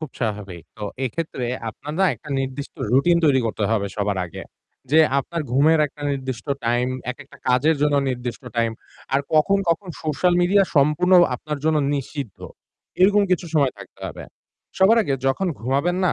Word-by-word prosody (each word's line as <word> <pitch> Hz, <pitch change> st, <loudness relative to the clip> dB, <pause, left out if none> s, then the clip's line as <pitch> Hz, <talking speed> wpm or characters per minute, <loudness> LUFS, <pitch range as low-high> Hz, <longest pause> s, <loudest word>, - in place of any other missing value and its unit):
খুব 155 Hz, -4 st, -6 dB
স্বাভাবিক। 100 Hz, -6 st, -4 dB
তো 105 Hz, -, -10 dB, 0.2 s
এক্ষেত্রে 130 Hz, -1 st, -3 dB, 0.2 s
আপনার 145 Hz, +7 st, -8 dB
না 190 Hz, -, +5 dB
একটা 150 Hz, -, -15 dB
নির্দিষ্ট 135 Hz, +1 st, -5 dB, 0.2 s
routine 170 Hz, +6 st, +4 dB
তৈরি 135 Hz, -3 st, +4 dB
করতে 110 Hz, -1 st, -2 dB
হবে 105 Hz, -3 st, +1 dB
সবার 100 Hz, -2 st, -1 dB
আগে। 85 Hz, -, -9 dB, 0.5 s
যে 160 Hz, -, +6 dB, 0.2 s
আপনার 165 Hz, +4 st, -3 dB
ঘুমের 155 Hz, +4 st, +4 dB
একটা 145 Hz, 0 st, -13 dB
নির্দিষ্ট 130 Hz, -3 st, -4 dB, 0.2 s
time, 120 Hz, +2 st, +1 dB, 0.2 s
একেকটা 135 Hz, +2 st, -11 dB
কাজের 145 Hz, +5 st, +3 dB
জন্য 150 Hz, -1 st, +3 dB, 0.2 s
নির্দিষ্ট 125 Hz, 0 st, -5 dB
time, 115 Hz, -1 st, +1 dB, 0.4 s
আর 140 Hz, -, +4 dB
কখন, 195 Hz, +6 st, +4 dB
কখন 180 Hz, +3 st, -1 dB, 0.2 s
social 155 Hz, +4 st, +1 dB
media 195 Hz, +3 st, +4 dB
সম্পূর্ণ 150 Hz, +6 st, +3 dB, 0.2 s
আপনার 150 Hz, +3 st, -5 dB
জন্য 160 Hz, -1 st, +3 dB, 0.2 s
নিষিদ্ধ। 140 Hz, -5 st, -5 dB, 0.6 s
এরকম 205 Hz, +2 st, +5 dB
কিছু 180 Hz, -1 st, +1 dB
সময় 140 Hz, -4 st, +3 dB
থাকতে 100 Hz, -, -14 dB
হবে। -, -, -9 dB, 0.5 s
সবার 210 Hz, +5 st, +6 dB
আগে 140 Hz, -, -1 dB
যখন 135 Hz, +9 st, +1 dB
ঘুমাবেন 140 Hz, +9 st, 0 dB
না, -, -, +2 dB
140 Hz, 165 wpm, -22 LUFS, 125-165 Hz, 0.6 s, যে